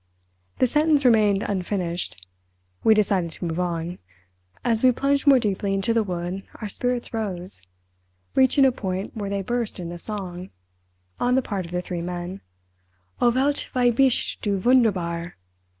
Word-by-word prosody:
The - - +4
sentence 295 +2 +3
remained 215 -4 +4
unfinished. 180 - -3 0.6
We 220 - +6
decided 195 -5 +2
to - - -6
move 165 +1 -2
on. 175 -1 -2 0.7
As 230 -1 +1
we 255 - +7
plunged 275 +3 0
more 275 -2 +8
deeply 200 -3 0
into 195 +4 +1
the 230 - +3
wood 180 -1 -3
our 215 - -6
spirits 245 +4 -2
rose—reaching 95 - -1
a 265 - +5
point 190 -4 -4
where 205 -3 -4
they 200 -1 -2
burst 240 -1 -2
into 175 0 -6
song—on 90 - -5
the 265 - +2
part 195 -6 -3
of - - -13
the 180 0 -2
three 175 -1 -4
men—"O 90 - -5
Welt, 270 +4 +1
wie 245 -1 +4
bist 260 +1 +2
du 200 -2 0
wunderbar!" 185 -7 +1
190 Hz, 145 wpm, -24 LUFS, 170-235 Hz, 0.7 s, more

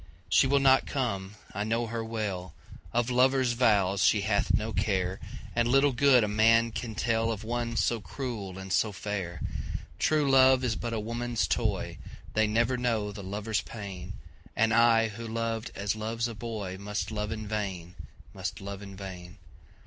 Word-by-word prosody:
She 135 - +5
will 140 +1 +3
not 135 -1 +5
come, 105 -7 -2 0.2
I 105 - -2
know 115 +2 0
her 115 0 -3
well, 100 -6 -4 0.4
Of 120 +1 +1
lover's 130 0 +3
vows 100 -6 +3
she - - +4
hath - - +1
no 110 +1 0
care, 95 -2 0 0.4
And 120 0 +2
little 135 +3 +4
good 130 -1 +5
a - - +1
man 115 +2 +4
can 110 -1 -5
tellOf 115 -1 0
one 120 +1 -2
so 115 - +2
cruel 105 -5 -5
and 95 -1 -5
so 110 - +2
fair. 95 -5 -4 0.6
True 150 -2 +2
love 130 -1 +6
is 120 -3 0
but 120 +1 -4
a 110 - -1
woman's 115 +1 -1
toy, - - -1 0.3
They 110 0 +3
never 115 +4 +1
know 115 -4 0
the 100 0 -8
lover's 105 +3 -2
pain, 95 -4 -7 0.4
And 110 +1 +3
I 115 -1 +5
who 115 +2 -7
loved 115 0 -2
as 100 +2 -1
loves 115 +2 -2
a 115 - -6
boyMust 105 -2 -4
love 105 0 -3
in 110 -1 -4
vain, 95 -5 -3 0.4
must - - -4
love 100 0 -7
in 100 -1 -9
vain. 90 -2 -9
110 Hz, 170 wpm, -29 LUFS, 100-120 Hz, 0.6 s, love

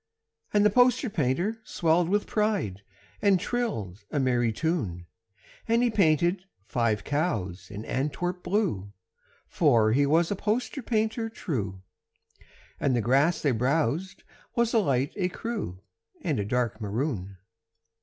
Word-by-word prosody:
And 205 0 +4
the 210 - +5
poster 250 +1 +3
painter 175 - 0
swelled 170 -1 +1
with 205 +2 +1
pride 205 - -1 0.4
And 200 -3 +4
trilled 140 - -3
a 145 - -1
merry 120 -3 +2
tune. 110 - -2 0.6
And 230 +1 +3
he 240 - +2
painted 175 -1 +2 0.2
five 110 -2 0
cows 100 - -2
in 105 +1 -7
Antwerp 175 +7 -2
blue 175 - -1 0.5
(For 115 -9 +3
he 140 +4 +3
was 165 +4 +3
a - - +1
poster 225 +7 -1
painter 225 0 -1
true), 105 - -4 1.0
And 135 -3 +1
the 120 - +2
grass 140 +9 +2
they 145 - +3
browsed 155 - 0 0.3
was 235 -1 +2
a 230 - +5
light 140 - +1
écru 195 - -3 0.5
And 155 - 0
a 100 - -1
dark 120 0 -1
maroon. 105 -3 -3
155 Hz, 135 wpm, -27 LUFS, -, 1.0 s, the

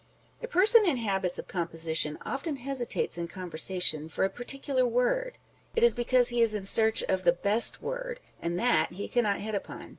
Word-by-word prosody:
A 475 - -5
person 440 +1 +5
in 335 -9 +1
habits 195 -5 -2
of - - -7
composition 160 -3 -2
often 295 +2 -3
hesitates 260 -8 -2
in 170 - -3
conversation 170 -2 -1
for 160 - -2
a 195 - -2
particular 270 +1 -2
word: 250 - 0 0.4
it 460 - +1
is 475 - +6
because 245 0 +2
he 240 -1 0
is 225 -2 +4
in 200 -2 -4
search 220 +2 +3
of 190 -1 -1
the 170 - +5
best 200 +6 +2
word, - - -5 0.2
and 170 +1 -2
that 245 -3 +1
he 200 +3 -6
cannot 215 -5 0
hit 215 +1 -5
upon. 200 - -6
225 Hz, 185 wpm, -28 LUFS, 180-275 Hz, 0.4 s, is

